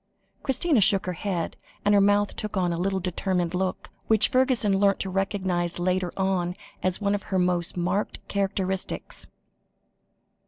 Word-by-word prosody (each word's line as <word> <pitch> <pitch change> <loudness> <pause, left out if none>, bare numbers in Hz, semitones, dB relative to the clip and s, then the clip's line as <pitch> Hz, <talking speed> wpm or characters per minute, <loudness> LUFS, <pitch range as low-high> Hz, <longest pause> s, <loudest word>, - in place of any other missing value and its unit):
Christina 275 -1 +2
shook 195 0 +4
her 180 - -2
head, 180 -1 -3 0.3
and 205 - +4
her 200 - +6
mouth 205 0 +3
took 210 -1 -4
on 175 -2 +1
a - - -3
little 190 +1 0
determined 180 -1 -1
look, 185 0 -2 0.2
which 220 0 +5
Fergusson 250 -7 +2
learnt 200 -1 +3
to 190 - -3
recognise 185 -3 -1
later 180 0 0
on 185 -2 0 0.3
as 185 -1 0
one 200 -1 +1
of 205 - -1
her 190 - +1
most 180 -1 +1
marked 180 +4 -2
characteristics. 195 -1 -3
190 Hz, 155 wpm, -26 LUFS, 180-205 Hz, 0.3 s, her